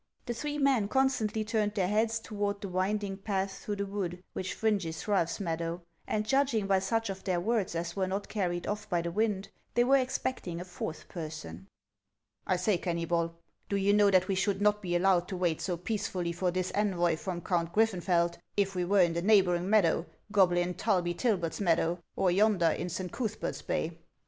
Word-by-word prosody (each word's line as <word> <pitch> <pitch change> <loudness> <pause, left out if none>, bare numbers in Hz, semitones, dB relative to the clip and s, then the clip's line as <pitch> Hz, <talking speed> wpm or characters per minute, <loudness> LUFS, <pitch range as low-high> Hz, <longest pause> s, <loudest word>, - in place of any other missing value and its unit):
The 240 - -2
three 295 +5 -3
men 270 -7 +3
constantly 225 -4 +1
turned 215 -1 0
their 190 -4 +1
heads 220 +3 +1
toward 205 -2 -3
the 200 - -5
winding 195 +2 -1
path 195 -1 -2
through 205 - -3
the 200 0 -2
wood 185 -3 -4
which 185 0 -3
fringes 200 -8 -1
Ralph's 190 -5 +1
meadow, 170 -1 -3 0.2
and 215 0 0
judging 265 -4 +2
by 195 -1 +3
such 225 +2 0
of 190 0 -8
their 185 -3 0
words 205 -1 0
as 170 +1 -3
were 190 -1 0
not 195 +2 -3
carried 175 -4 -2
off 210 +1 -4
by 175 -3 +1
the 170 - -2
wind, 205 0 0 0.3
they 240 - +5
were 270 +3 +5
expecting 255 -8 -2
a 180 - -6
fourth 175 -3 -6
person. 155 - -7 0.4
" 100 +2 -39
I 185 - +3
say, 180 +1 +1
Kennybol, 170 -1 -1 0.3
do 200 - 0
you 200 +1 +3
know 205 -1 +5
that 185 -1 +4
we 195 - +1
should 195 +1 0
not 210 0 +3
be 175 -3 -2
allowed 180 0 +3
to 185 - -4
wait 175 -3 0
so 180 -2 -2
peacefully 180 -2 -2
for 180 +2 0
this 185 +1 -1
envoy 175 -5 +2
from 175 +2 -4
Count 170 -1 0
Griffenfeld, 175 -4 +2 0.2
if 195 -1 +2
we 180 -1 -1
were 195 +2 +4
in 170 -2 +3
the 170 - -1
neighboring 185 -3 +3
meadow, 180 -5 +3 0.2
Goblin 180 -3 +3
Tulbytilbet's 180 -1 0
meadow, 170 -1 +2 0.2
or 185 - +2
yonder 190 -3 +4
in 180 - -3
St. 180 +1 -4
Cuthbert's 230 -3 -3
bay?" 165 +1 -2
190 Hz, 195 wpm, -30 LUFS, 175-210 Hz, 0.4 s, they